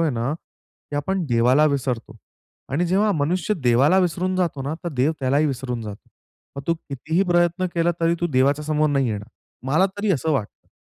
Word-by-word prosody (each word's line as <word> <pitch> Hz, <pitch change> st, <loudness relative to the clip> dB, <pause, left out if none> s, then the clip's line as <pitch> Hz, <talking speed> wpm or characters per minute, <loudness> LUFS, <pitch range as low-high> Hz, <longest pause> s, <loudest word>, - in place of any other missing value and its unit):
आहे 165 Hz, -2 st, +2 dB
ना, 120 Hz, +2 st, -1 dB
की 145 Hz, -2 st, -13 dB
आपण 185 Hz, +4 st, -1 dB
देवाला 125 Hz, +4 st, +4 dB
विसरतो 125 Hz, -4 st, -3 dB, 0.6 s
आणि 170 Hz, +5 st, +1 dB
जेव्हा 200 Hz, +4 st, +2 dB
मनुष्य 175 Hz, +6 st, 0 dB
देवाला 130 Hz, +9 st, +4 dB
विसरून 185 Hz, +1 st, 0 dB
जातो 165 Hz, -7 st, -1 dB
ना, 145 Hz, +4 st, -3 dB
तर -, -, -1 dB
देव 145 Hz, 0 st, +1 dB
त्यालाही 140 Hz, +3 st, +2 dB
विसरून 125 Hz, -4 st, -3 dB
जातो. 105 Hz, -2 st, -9 dB, 0.5 s
मग 140 Hz, -, -5 dB
तू 170 Hz, -, +2 dB
कितीही 160 Hz, +4 st, -2 dB
प्रयत्न 175 Hz, +1 st, +2 dB
केला 170 Hz, 0 st, +2 dB
तरी 165 Hz, 0 st, +3 dB
तू 175 Hz, -, +1 dB
देवाच्यासमोर 150 Hz, +4 st, +2 dB
नाही 135 Hz, -3 st, +1 dB
येणार. 105 Hz, 0 st, -4 dB, 0.4 s
मला 155 Hz, +8 st, +3 dB
तरी 205 Hz, 0 st, 0 dB
असं 160 Hz, +1 st, -1 dB
वाटतं. 120 Hz, -8 st, -4 dB
150 Hz, 180 wpm, -22 LUFS, 130-175 Hz, 0.6 s, देवाला